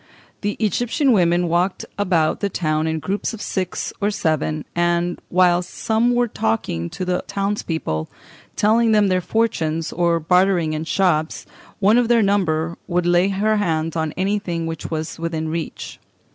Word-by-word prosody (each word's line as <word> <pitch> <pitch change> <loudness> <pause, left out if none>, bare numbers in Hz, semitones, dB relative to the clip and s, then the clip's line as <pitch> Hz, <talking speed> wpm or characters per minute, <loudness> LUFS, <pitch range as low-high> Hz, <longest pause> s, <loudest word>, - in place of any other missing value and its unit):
The 205 0 -1
Egyptian 245 - +1
women 175 -4 +3
walked 175 +3 0
about 180 -6 +1
the 200 - -1
town 155 -3 -1
in 160 0 -1
groups 195 +7 -3
of - - -12
six 185 -2 -3
or 205 - +2
seven, 155 -6 -1
and 175 0 0
whilst 180 0 +3
some 230 +2 +1
were 245 0 +2
talking 95 - -2
to 185 - -5
the 180 0 -1
townspeople, 165 - -2 0.5
telling 225 +2 +3
them 210 -2 +4
their 185 0 +2
fortunes, 165 -7 -1
or 170 -1 +2
bartering 180 -1 +2
in 155 +1 -3
shops, 160 -3 0 0.3
one 210 +4 +4
of 245 - +1
their 235 -1 +4
number 170 -5 0
would 175 -1 0
lay 175 +2 +4
her 210 +2 +1
hands 165 -5 -1
on 160 -1 -1
anything 190 -4 -1
which 165 -1 -5
was 160 0 -4
within 160 -1 -3
reach. 165 0 -5
175 Hz, 160 wpm, -21 LUFS, 160-205 Hz, 0.5 s, them